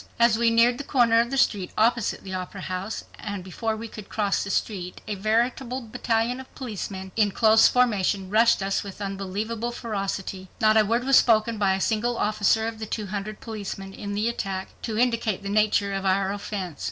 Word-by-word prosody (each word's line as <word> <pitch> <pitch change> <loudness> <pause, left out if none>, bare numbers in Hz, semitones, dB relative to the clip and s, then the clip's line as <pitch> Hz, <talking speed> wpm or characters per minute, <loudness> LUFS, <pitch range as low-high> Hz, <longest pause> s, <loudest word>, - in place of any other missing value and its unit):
As 235 -1 +5
we 230 +1 +3
neared 235 +2 +4
the - - -3
corner 235 -5 +3
of 235 +1 +2
the 270 - -2
street 200 -8 +2
opposite 230 0 +1
the 190 - -7
Opera 185 +1 -5
House 185 +3 -4 0.2
and 205 -3 -5
before 220 +4 -3
we 230 +1 -6
could 215 -2 -10
cross 205 -2 0
the 200 - -6
street 185 -2 -2
a 215 - -2
veritable 235 +5 0
battalion 230 +1 -1
of 265 - -12
policemen 195 -6 -6
in 215 -2 +3
close 220 +2 +5
formation 205 -6 +1
rushed 225 -1 +4
us 195 0 0
with 200 -1 -9
unbelievable 205 +4 -3
ferocity. 195 -4 -4
Not 215 -1 +4
a 220 - +6
word 230 +4 0
was 270 0 +5
spoken 225 -1 +2
by 195 -2 +3
a - - -3
single 230 +4 0
officer 215 +1 +2
of 225 -1 -5
the 220 - -5
two 215 0 -3
hundred 210 +1 -5
policemen 200 -3 -6
in 205 0 -6
the 210 +2 0
attack 195 -5 -3
to 220 -2 -3
indicate 230 -4 +1
the 200 - -4
nature 205 -1 +2
of 195 0 -2
our 195 0 +1
offense. 195 -5 -5
215 Hz, 200 wpm, -25 LUFS, 195-230 Hz, 0.2 s, a